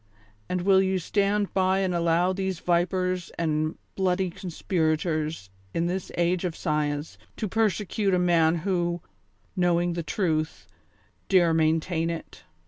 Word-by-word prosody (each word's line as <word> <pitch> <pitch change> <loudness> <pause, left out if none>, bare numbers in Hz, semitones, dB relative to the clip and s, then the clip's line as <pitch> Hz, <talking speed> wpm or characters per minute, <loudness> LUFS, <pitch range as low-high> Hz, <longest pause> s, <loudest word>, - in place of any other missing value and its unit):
And 180 -1 -1
will 190 +1 +5
you 190 0 +1
stand 200 +3 0
by 190 0 +2
and 185 -2 0
allow 170 +2 +2
these 190 -1 -2
vipers 180 +1 0
and 155 -1 0 0.2
bloody 185 -1 +1
conspirators, 155 - -1 0.2
in 165 - +1
this 180 +1 -3
age 175 +1 +1
of 175 -3 -2
science, 150 -2 -2 0.2
to 215 - -2
persecute 210 -1 0
the 185 - +3
man 170 -2 +3
who, 175 -3 0 0.5
knowing 175 -1 +2
the 170 - -2
truth, 160 -2 -1 0.6
dare 175 -4 +5
maintain 160 +1 +1
it. 165 -1 -6
175 Hz, 135 wpm, -26 LUFS, 165-185 Hz, 0.6 s, will